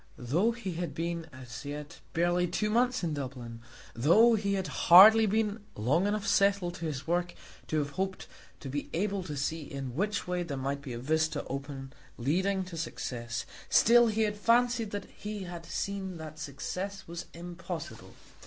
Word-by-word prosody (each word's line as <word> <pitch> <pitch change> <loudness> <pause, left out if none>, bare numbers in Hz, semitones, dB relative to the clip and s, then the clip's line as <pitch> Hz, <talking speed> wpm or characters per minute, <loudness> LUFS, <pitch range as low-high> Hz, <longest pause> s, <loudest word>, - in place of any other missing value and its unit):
Though 150 - +1
he 230 -5 -4
had 170 -2 -4
been 170 0 -3
as 125 -2 -9
yet 150 +2 -7
barely 175 +1 +2
two 210 +5 -1
months 245 0 +2
in 165 -3 0
Dublin, 125 -5 -6 0.3
though 175 - +5
he 200 -2 +1
had 190 -1 -1 0.2
hardly 215 +5 +10
been 215 +1 0 0.2
long 145 - +2
enough 210 0 -1
settled 200 -4 +3
to 170 - -5
his 145 -3 -4
work 175 +1 0 0.3
to 155 - -1
have 145 -1 -1
hoped 190 +3 -3 0.4
to - - -7
be 145 +2 -4
able 195 +3 0
to 150 -5 -6
see 160 +4 -1
in 135 -3 -6
which 205 +5 -1
way 180 0 -1
there 155 -6 -4
might 140 +1 -2
be 135 -4 -6
a - - -4
vista 160 +5 0
open 135 0 -6 0.2
leading 190 +10 +1
to 180 -2 -8
success, 120 -7 -4 0.2
still 240 +1 +6
he 220 0 +1
had 210 -1 -1
fancied 235 +1 +3
that 205 -1 -4
he 210 -1 -7
had 175 -2 -8
seen 195 -2 -3
that 155 -1 -9
success 185 +8 -5
was 170 +1 -6
impossible. 170 -1 -7
175 Hz, 175 wpm, -30 LUFS, 145-200 Hz, 0.4 s, hardly